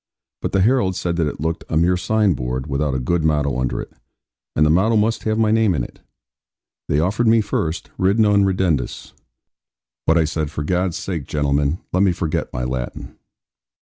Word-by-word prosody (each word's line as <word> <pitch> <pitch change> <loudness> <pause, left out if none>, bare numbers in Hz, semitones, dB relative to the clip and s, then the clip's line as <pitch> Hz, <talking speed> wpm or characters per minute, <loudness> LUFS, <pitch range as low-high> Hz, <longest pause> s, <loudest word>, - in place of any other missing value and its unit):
But - - -2
the 95 - +2
heralds 105 -4 +2
said 85 -1 -1
that 80 -3 +1
it 75 - -5
looked 80 +3 -2
a 80 - 0
mere 85 +3 +3
sign 105 +1 +2
board, 65 -1 -3
without 70 -1 -1
a - - 0
good 80 +6 0
motto 75 -4 +1
under 65 -1 -1
it; - - -7 0.6
and 75 - +4
the 75 - +3
motto 100 +7 +3
must 110 +2 +1
have 110 0 +1
my 110 -1 +2
name 110 -5 +3
in 65 - -1
it. - - -11 0.9
They 75 - +1
offered 100 +8 +1
me 115 +1 +5
first, 85 -5 -2
'Ridd 95 +3 +2
non 105 -2 +4
ridendus'; 90 -9 -1 0.9
but 80 - +4
I 80 - +4
said, 80 -1 -2
'for 75 -1 -4
God's 90 +2 0
sake, 90 -7 -4
gentlemen, 70 +1 0
let 90 - +2
me 95 -3 +4
forget 80 -2 -2
my 60 - -3
Latin.' 65 -1 -5
85 Hz, 195 wpm, -20 LUFS, 75-100 Hz, 0.9 s, me